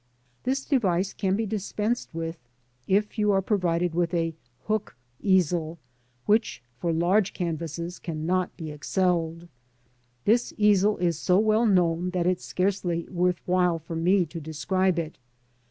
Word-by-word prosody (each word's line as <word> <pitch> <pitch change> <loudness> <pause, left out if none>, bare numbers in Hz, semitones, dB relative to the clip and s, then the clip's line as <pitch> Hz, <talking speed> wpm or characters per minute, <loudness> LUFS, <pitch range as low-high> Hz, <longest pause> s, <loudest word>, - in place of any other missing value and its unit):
This 270 +2 0
device 195 - +1
can 190 -1 0
be 220 +2 -1
dispensed 215 +3 -2
with 165 0 -5 0.5
if 210 +3 +1
you 210 -1 +3
are 195 - +3
provided 180 -4 +1
with 175 +1 0
a 165 -1 0 0.3
"Hook'' 215 -1 -2 0.3
easel, 175 -4 +2 0.5
which, 205 - +1 0.2
for 170 - 0
large 180 +5 +2
canvases 170 0 -4
cannot 175 +2 -2
be 160 -3 -6
excelled. 170 +1 -1 0.8
This 235 +3 +2
easel 210 0 +4
is 170 -3 0
so 180 +1 +3
well 220 +2 +3
known 175 -3 +2
that 175 - +1
it 180 0 +2
is - - -15
scarcely 180 -3 -1
worth 180 -1 0
while 180 -2 +2
for 165 +1 -7
me 180 +3 +3
to 165 +1 -8
describe 170 +5 0
it. 160 -4 -4
180 Hz, 145 wpm, -26 LUFS, 165-200 Hz, 0.8 s, easel